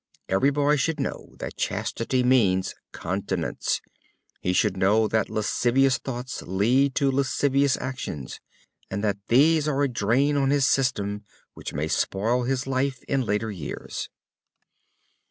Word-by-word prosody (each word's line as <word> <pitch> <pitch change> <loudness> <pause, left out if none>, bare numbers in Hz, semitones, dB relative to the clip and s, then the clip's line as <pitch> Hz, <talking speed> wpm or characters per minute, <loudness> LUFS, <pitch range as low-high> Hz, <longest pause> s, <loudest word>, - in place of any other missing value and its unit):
Every 95 +9 +3
boy 145 +1 +2
should 155 +3 0
know 135 - -5
that - - -7
chastity 125 +2 -1
means 100 -8 +3 0.2
continence. 95 -1 -2 0.6
He 90 - -1
should 95 +1 +2
know 105 +4 +3
that 110 -1 0
lascivious 125 +4 +2
thoughts 125 -1 -5
lead 125 +9 +2
to 140 -2 +2
lascivious 140 0 +2
actions, 125 - -5 0.5
and 100 +2 -3
that 100 -2 0
these 155 +5 +4
are 145 -1 +1
a - - +3
drain 130 +5 +1
on 135 -1 +2
his 140 -1 +3
system 105 -7 0 0.3
which - - -8
may 75 +2 -1
spoil 115 +9 0
his 130 0 -1
life 130 -1 -1
in 135 -1 0
later 110 -1 -1
years. 85 -8 -6
125 Hz, 135 wpm, -25 LUFS, 100-135 Hz, 0.6 s, these